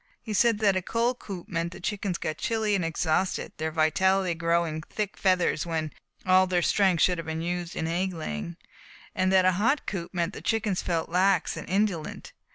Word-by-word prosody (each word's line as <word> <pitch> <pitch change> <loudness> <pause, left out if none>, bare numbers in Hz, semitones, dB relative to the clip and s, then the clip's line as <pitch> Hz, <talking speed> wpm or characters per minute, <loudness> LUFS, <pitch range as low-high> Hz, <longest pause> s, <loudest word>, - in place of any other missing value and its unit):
He 220 - -4
said 220 +1 +3
a 195 -2 +3
cold 235 +6 0
coop 185 -4 -8
meant 170 +1 -2
that - - -9
the - - -13
chickens 200 -4 -2
got 155 -1 -4
chilly 220 -2 0
and 195 -3 +1
exhausted 165 +2 0
their 160 +1 -2
vitality 175 +4 +2
growing 165 -1 0
thick 210 +4 -4
feathers 185 -5 +2
when 160 -2 -3 0.3
all 185 0 +5
their 180 -1 +1
strength 190 -3 +3
should 180 -2 +2
have 165 - -6
been 160 +1 -3
used 175 0 -3
in - - -2
egg 180 +3 -1
laying, 170 +1 -5 0.6
and 185 0 +1
that 190 -1 +5
a 185 - +5
hot 265 +7 +2
coop 175 -4 -4
meant 175 +1 -1
that - - -7
the - - -4
chickens 215 -4 0
felt 165 -2 -1
lax 185 0 +2
and - - -8
indolent. 190 -4 -1
185 Hz, 200 wpm, -27 LUFS, 165-195 Hz, 0.6 s, all